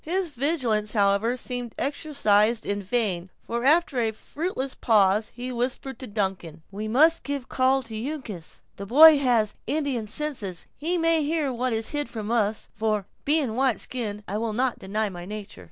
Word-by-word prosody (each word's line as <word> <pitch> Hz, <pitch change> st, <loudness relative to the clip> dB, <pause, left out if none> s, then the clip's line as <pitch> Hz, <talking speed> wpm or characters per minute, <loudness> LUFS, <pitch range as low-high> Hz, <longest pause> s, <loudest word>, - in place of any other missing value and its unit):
His 360 Hz, +2 st, -1 dB
vigilance, 250 Hz, -7 st, 0 dB
however, 205 Hz, +3 st, +2 dB
seemed 245 Hz, -2 st, -5 dB
exercised 235 Hz, -7 st, +1 dB
in 200 Hz, 0 st, -1 dB
vain; 195 Hz, -4 st, -1 dB
for 235 Hz, +1 st, -3 dB
after 300 Hz, -1 st, +3 dB
a 225 Hz, -2 st, +2 dB
fruitless 275 Hz, -, -4 dB
pause, 210 Hz, -1 st, +3 dB
he 250 Hz, +1 st, -5 dB
whispered 255 Hz, +2 st, -3 dB
to 260 Hz, -, -7 dB
Duncan: 190 Hz, -6 st, -3 dB
"We 210 Hz, +2 st, -5 dB
must 310 Hz, +9 st, +4 dB
give 280 Hz, -2 st, -3 dB
a -, -, -24 dB
call 260 Hz, +1 st, +2 dB
to 230 Hz, -2 st, -8 dB, 0.2 s
Uncas. 215 Hz, -, -8 dB
The 200 Hz, -, -7 dB
boy 305 Hz, +5 st, +8 dB
has 235 Hz, -6 st, +2 dB
Indian 280 Hz, -7 st, -1 dB
senses, 215 Hz, -, -3 dB
and 310 Hz, +3 st, -7 dB
he 360 Hz, -, +2 dB
may 330 Hz, -1 st, +3 dB
hear 300 Hz, -2 st, 0 dB
what 250 Hz, +1 st, -1 dB
is 225 Hz, 0 st, -1 dB
hid 290 Hz, -1 st, -2 dB
from 220 Hz, -1 st, -5 dB
us; 215 Hz, -2 st, 0 dB
for, 215 Hz, -3 st, -1 dB, 0.2 s
being 295 Hz, -3 st, +2 dB
a -, -, -4 dB
white 255 Hz, -1 st, +1 dB
skin, 215 Hz, -5 st, -3 dB
I 200 Hz, -, -2 dB
will 225 Hz, -1 st, -2 dB
not 250 Hz, +3 st, 0 dB
deny 210 Hz, +3 st, -1 dB
my 175 Hz, -2 st, -8 dB
nature." 205 Hz, -, -8 dB
235 Hz, 185 wpm, -25 LUFS, 210-280 Hz, 0.2 s, boy